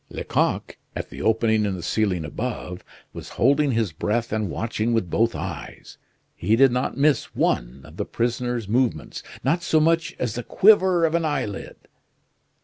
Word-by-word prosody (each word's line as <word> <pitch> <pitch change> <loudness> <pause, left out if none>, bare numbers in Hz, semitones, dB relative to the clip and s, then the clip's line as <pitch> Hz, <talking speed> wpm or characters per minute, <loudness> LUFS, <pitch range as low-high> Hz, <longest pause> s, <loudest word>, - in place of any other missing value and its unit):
Lecoq, - - -1 0.2
at - - -5
the - - -8
opening 110 -1 +2
in 100 -2 -1
the 90 - -7
ceiling 95 -7 0
above, 90 0 -5 0.3
was - - -8
holding 140 +2 +3
his 110 -5 0
breath 110 +8 -2
and 110 -3 -1
watching 115 +3 -2
with 100 -7 -1
both 115 +2 +1
eyes. - - -7 0.4
He 105 +6 +1
did 135 +2 +5
not 125 0 -1
miss 145 0 +1
one - - 0
of - - -14
the - - -2
prisoner's 120 -1 -2
movements 115 - -1 0.2
not 165 +7 +1
so 160 - +2
much 165 +1 +1
as 120 -4 -2
the 120 - -3
quiver 185 - +4
of 160 - 0
an 170 0 +1
eyelid. 145 -10 -3
115 Hz, 165 wpm, -23 LUFS, 105-140 Hz, 0.4 s, did